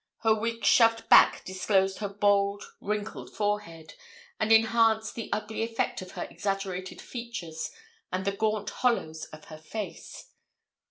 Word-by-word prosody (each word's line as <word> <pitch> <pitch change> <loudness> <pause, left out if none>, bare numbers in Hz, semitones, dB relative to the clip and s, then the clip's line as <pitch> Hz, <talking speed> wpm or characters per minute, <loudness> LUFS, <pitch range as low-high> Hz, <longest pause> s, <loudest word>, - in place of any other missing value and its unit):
Her 225 -1 +5
wig 230 +1 -2
shoved 230 -1 +5
back - - +7
disclosed 190 0 +1
her 205 -2 -2
bald 200 0 +2 0.2
wrinkled 210 0 -4
forehead, 205 -7 -3 0.5
and 215 0 +1
enhanced 225 -1 +4
the 230 - -6
ugly 215 +1 -2
effect 225 -3 -1
of 185 0 -10
her - - -4
exaggerated 195 -2 -4
features 205 -10 -6 0.4
and 185 +1 -2
the 200 - +2
gaunt 215 0 -1
hollows 160 -11 0
of 155 0 -13
her 155 -1 -11
face. 205 +7 -7
205 Hz, 140 wpm, -28 LUFS, 190-225 Hz, 0.5 s, back